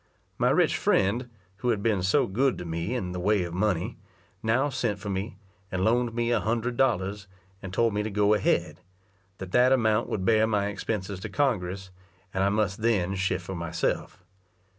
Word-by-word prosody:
My - - +3
rich - - +3
friend, 115 +6 +1 0.3
who 125 +4 -1
had 105 -4 0
been 105 -5 +2
so 95 +1 +3
good 125 +7 +1
to 90 - -6
me 85 +8 -3
in 95 -8 -3
the 90 - -4
way 100 +1 +2
of 85 -1 -6
money, 90 -2 -1 0.4
now 125 +6 +2
sent 120 -6 -1
for 100 0 -5
me, 95 +2 -4 0.3
and 95 +1 0
loaned 120 0 +1
me 120 0 0
a 120 - +3
hundred 115 +3 -1
dollars, 105 -6 0 0.3
and 95 - -7
told 115 +3 +2
me 105 - 0
to 105 - -3
go 105 0 +3
ahead; 100 -3 0 0.6
that 95 -1 -8
that 125 +4 +5
amount 110 -3 +2
would 95 -3 -2
bear 110 0 +4
my 105 -2 +1
expenses 100 -1 -4
to - - -6
Congress, 95 -9 -1 0.4
and 95 - +1
I 100 - +3
must 105 -1 0
then 100 -5 +1
shift 95 -1 -1
for 95 - -5
myself. 85 +2 -3
105 Hz, 190 wpm, -27 LUFS, 95-115 Hz, 0.6 s, that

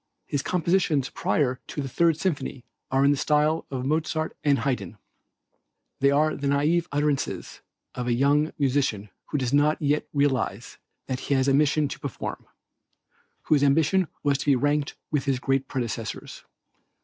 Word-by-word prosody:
His 140 - -2
compositions 170 -5 +1
prior 150 -9 0
to - - -6
the 140 - -2
Third 165 +4 +2
Symphony 140 -8 -3 0.2
are 135 +1 +3
in 140 - +5
the 145 - +1
style 150 +3 +1
of 130 -2 -4
Mozart 155 +2 -1
and 145 -2 +3
Haydn. 110 -9 -2 1.0
They 140 - +4
are 150 +2 +2
the 140 - -3
naïve 155 +5 +2
utterances 145 -1 -2 0.3
of 125 0 -4
the 120 - +2
young 145 +4 +2
musician 130 -8 0 0.2
who 150 - -2
does 130 -1 -1
not 150 +2 +3
yet 150 0 0
realize 130 -6 -1 0.3
that 130 -1 -3
he 140 - -1
has 130 0 +2
a 135 - +4
mission 150 +1 +3
to - - -7
perform; 140 - -6 1.0
whose 150 -3 +3
ambition 160 +6 +3 0.2
was 140 -2 +2
to - - -5
be 140 - +5
ranked 145 +2 0 0.2
with 150 -3 0
his 135 -2 +1
great 135 0 0
predecessors. 115 -3 -5
140 Hz, 160 wpm, -25 LUFS, 135-150 Hz, 1.0 s, in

